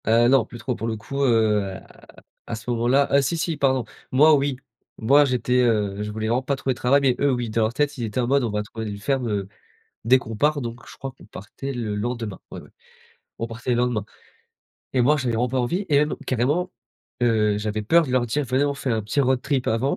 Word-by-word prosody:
Heu, 115 +1 +5
non, 135 -3 +4
plus 120 - -11
trop, 125 +3 -3
pour 115 - -4
le 115 - -1
coup, 135 +6 -5
heu, 110 -5 +3
à 95 -1 -10 0.4
à - - -3
ce 115 +2 -8
moment-là 120 +4 +2
ah 140 - +5
si, 140 +5 -1
si, 165 0 -1
pardon, 130 -4 +1 0.3
moi 150 +4 +6
oui, 140 -2 0 0.4
moi 140 +6 +5
j'étais, 125 -2 -1
heu, 105 -4 +1
je 105 0 -4
voulais 110 +1 -3
vraiment 120 +3 +1
pas 140 +2 -1
trouver 135 -1 -1
de - - -14
travail, 135 +3 +4
mais 130 -3 +3
eux, 140 0 +3
oui, 120 -2 -2
dans 115 - +1
leur 110 +1 +1
tête, 145 +2 0
ils 120 - -4
étaient 110 +2 -3
en 125 - +1
mode: 140 +1 +2
«On 120 - -1
va 105 0 -2
trouver 110 0 -6
une 100 - -5
ferme, 125 +3 -1
heu, 100 -2 -2 0.6
dès 125 +3 +6
qu'on 115 -3 -7
part», 150 +5 +2
donc 120 0 -6
je - - -12
crois 135 -1 -6
qu'on - - -16
partait 135 +7 -7
le 115 -5 -3
lendemain, 115 -1 -4
oui, - - -7
oui, - - -17 0.7
on 115 - -2
partait 115 +2 -7
le 120 - +2
lendemain. 120 -4 0 0.9
Et 130 - +1
moi, 145 +5 +4
j'avais 130 -5 -1
vraiment 120 +2 +1
pas 130 +1 -1
envie, 175 +12 -1
et 145 - +4
même 150 0 0
carrément, 145 +9 0 0.5
heu, 105 -3 +2
j'avais 105 0 -2
peur 165 +9 +4
de 130 - -5
leur 125 -1 +2
dire: 140 +6 -1
«Venez, 130 +3 +1
on 145 - 0
fait 135 -2 -3
un 110 -1 0
petit 110 +7 0
road 130 -1 +1
trip 140 -3 -1
avant», 115 +5 +1
125 Hz, 250 wpm, -23 LUFS, 110-135 Hz, 0.9 s, moi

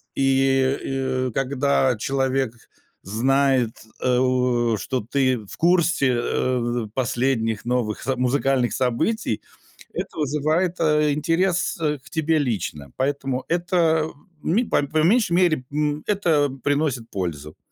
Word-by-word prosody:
и, 135 -1 +1
и - - -8
когда 135 -1 +1
человек 135 0 0 0.5
знает, 130 +2 +2 0.3
э, 125 -1 +2 0.6
что 130 +5 -2
ты 130 -3 +2
в - - -11
курсе, 170 -5 +3
э, 120 -3 -1
последних 120 -3 0
новых 120 -3 -1
со 135 - 0
музыкальных 130 0 +1
событий, 130 - 0 0.5
это - - -5
вызывает, 155 +5 0
э, 150 -2 +3
интерес, 170 +5 0
э, 150 -2 0
к 130 - -18
тебе 160 0 +1
лично. 95 - -3
Поэтому 135 -1 -1
это, 170 -2 +2 0.4
ми 215 +9 +1
по 185 - +1
по 155 +2 -2
меньшей 195 0 +3
мере, 170 -7 +2
м, 150 0 -1
это 165 -9 +2
приносит 145 -5 0
пользу. 75 -6 -5
135 Hz, 120 wpm, -23 LUFS, 125-155 Hz, 0.6 s, курсе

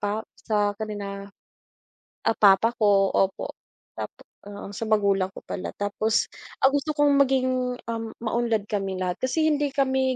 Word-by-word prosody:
pa 210 +2 -2
sa 205 -2 +1
kanila, 200 -2 -5 1.0
ah, 225 - +2
papa 205 +3 +6
ko 195 -2 +4
opo. 195 0 0 0.4
Tap - - -4 0.4
oo, 205 0 -8
sa 215 - -4
magulang 200 -3 +2
ko - - -8
pala. 185 - -4
Tapos 210 +2 +1 0.4
ang 270 - +6
gusto 290 +2 0
kong 290 -1 +4
maging, 255 -2 +1
um, 225 -1 -3
maunlad 230 -2 0
kaming 195 -2 -2
lahat 180 -1 -2
kasi 315 +4 +1
hindi 290 -1 +1
kami 265 -1 +2
220 Hz, 150 wpm, -25 LUFS, 200-255 Hz, 1.0 s, papa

